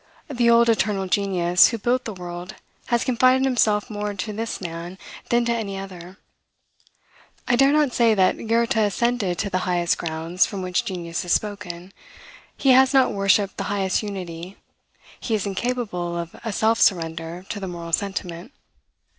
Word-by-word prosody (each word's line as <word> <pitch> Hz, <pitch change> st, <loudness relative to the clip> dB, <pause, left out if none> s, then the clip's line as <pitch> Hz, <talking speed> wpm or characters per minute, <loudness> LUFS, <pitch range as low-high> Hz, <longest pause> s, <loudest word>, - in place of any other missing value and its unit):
The 240 Hz, -3 st, +2 dB
old 235 Hz, 0 st, +5 dB
Eternal 210 Hz, -4 st, +1 dB
Genius 180 Hz, -3 st, +3 dB
who 230 Hz, -, -2 dB
built 245 Hz, +4 st, 0 dB
the 220 Hz, -, -4 dB
world 175 Hz, -1 st, -8 dB, 0.3 s
has 235 Hz, -1 st, +1 dB
confided 255 Hz, +1 st, +3 dB
himself 220 Hz, -5 st, +2 dB
more 205 Hz, -1 st, -4 dB
to 210 Hz, +2 st, -4 dB
this 225 Hz, +2 st, -4 dB
man 175 Hz, +1 st, -7 dB, 0.3 s
than 240 Hz, 0 st, +2 dB
to 235 Hz, -, +1 dB
any 205 Hz, -4 st, -3 dB
other. 185 Hz, -1 st, -9 dB, 1.3 s
I 245 Hz, -, +3 dB
dare 270 Hz, +3 st, +5 dB
not 295 Hz, -4 st, +2 dB
say 230 Hz, -2 st, +3 dB
that 190 Hz, +3 st, +1 dB
Goethe 235 Hz, +3 st, +2 dB
ascended 215 Hz, -2 st, 0 dB
to 200 Hz, -, -2 dB
the 185 Hz, -, +1 dB
highest 175 Hz, -1 st, +1 dB
grounds 165 Hz, +2 st, 0 dB
from 195 Hz, -3 st, -5 dB
which 180 Hz, -1 st, -1 dB
genius 170 Hz, -3 st, -4 dB
has 175 Hz, -, 0 dB
spoken. 195 Hz, -3 st, -4 dB, 0.6 s
He 270 Hz, -, +3 dB
has 265 Hz, +2 st, +5 dB
not 265 Hz, -4 st, +4 dB
worshipped 195 Hz, 0 st, +2 dB
the -, -, -3 dB
highest 195 Hz, -2 st, 0 dB
unity; 185 Hz, -3 st, -7 dB, 0.6 s
he 225 Hz, -, -1 dB
is 210 Hz, -, -2 dB
incapable 200 Hz, -5 st, -3 dB
of 170 Hz, -1 st, -6 dB
a 225 Hz, -, -3 dB
self 220 Hz, +3 st, +1 dB
surrender 165 Hz, 0 st, 0 dB
to 205 Hz, -, -4 dB
the 190 Hz, -, -5 dB
moral 170 Hz, -2 st, -7 dB
sentiment. 195 Hz, -, -3 dB
200 Hz, 165 wpm, -23 LUFS, 175-230 Hz, 1.3 s, old